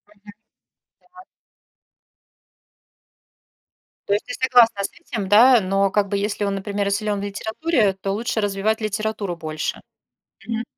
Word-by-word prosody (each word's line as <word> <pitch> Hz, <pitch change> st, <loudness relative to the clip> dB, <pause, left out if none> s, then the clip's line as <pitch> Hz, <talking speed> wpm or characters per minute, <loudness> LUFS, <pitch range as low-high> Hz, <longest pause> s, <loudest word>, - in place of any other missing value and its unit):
Мгм. 205 Hz, 0 st, -15 dB, 0.7 s
Да. 365 Hz, 0 st, -17 dB, 2.8 s
То 200 Hz, -, +1 dB
есть 205 Hz, -, -1 dB
ты -, -, -6 dB
согласна 235 Hz, -5 st, +4 dB
с -, -, -4 dB
этим, 235 Hz, -, -6 dB
да, 235 Hz, +5 st, +7 dB
но 195 Hz, 0 st, +1 dB
как 205 Hz, 0 st, +1 dB
бы, 200 Hz, 0 st, -1 dB
если 205 Hz, 0 st, -2 dB
он, 200 Hz, -, -1 dB
например, 200 Hz, +1 st, -2 dB
и -, -, 0 dB
силён 205 Hz, 0 st, -1 dB
в 200 Hz, -, -5 dB
литературе, 220 Hz, +4 st, 0 dB
то 195 Hz, +1 st, -4 dB
лучше 225 Hz, +2 st, -2 dB
развивать 205 Hz, +1 st, 0 dB
литературу 215 Hz, -3 st, -3 dB
больше. 155 Hz, -1 st, -4 dB, 0.7 s
Мгм. 230 Hz, 0 st, -2 dB
205 Hz, 140 wpm, -22 LUFS, 200-225 Hz, 2.8 s, да